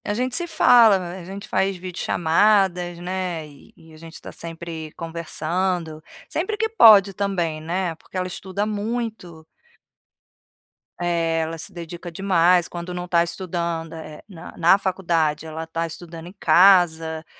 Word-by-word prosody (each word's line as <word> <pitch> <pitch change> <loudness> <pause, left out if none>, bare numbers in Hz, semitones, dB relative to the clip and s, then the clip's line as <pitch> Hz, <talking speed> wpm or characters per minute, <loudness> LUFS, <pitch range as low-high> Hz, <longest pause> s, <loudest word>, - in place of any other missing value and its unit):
A 205 - -2
gente 250 +2 -1
se 345 0 -1
fala, 230 - +6
a 180 0 -7
gente 195 +3 -8
faz 195 0 0
videochamadas, 180 0 +1
né, 175 -2 -4
e 145 -2 -18
e 160 -1 -17
a - - -14
gente 165 0 -12
tá - - -10
sempre 165 -1 -8
conversando. 165 0 -3 0.2
Sempre 375 +6 -2
que 445 - 0
pode 215 - +7
também, 180 -6 -2
né, 175 +2 -2
porque 175 - -11
ela 185 - -1
estuda 190 +2 -4
muito. 215 -6 -4 1.5
É, 170 -2 0
ela 160 +1 -4
se 165 - -9
dedica 175 0 -8
demais. 180 -1 +3
Quando 175 +1 -7
não 180 0 -5
tá 170 -1 +3
estudando 170 -2 -4
é 160 -1 -9
é - - -17
na 180 -6 -11
na 175 +3 +5
faculdade, 165 -6 -1
ela 160 +1 -6
tá 165 +1 -3
estudando 165 0 -10
em 185 - -13
casa, 165 -4 +4
175 Hz, 150 wpm, -22 LUFS, 165-190 Hz, 1.5 s, pode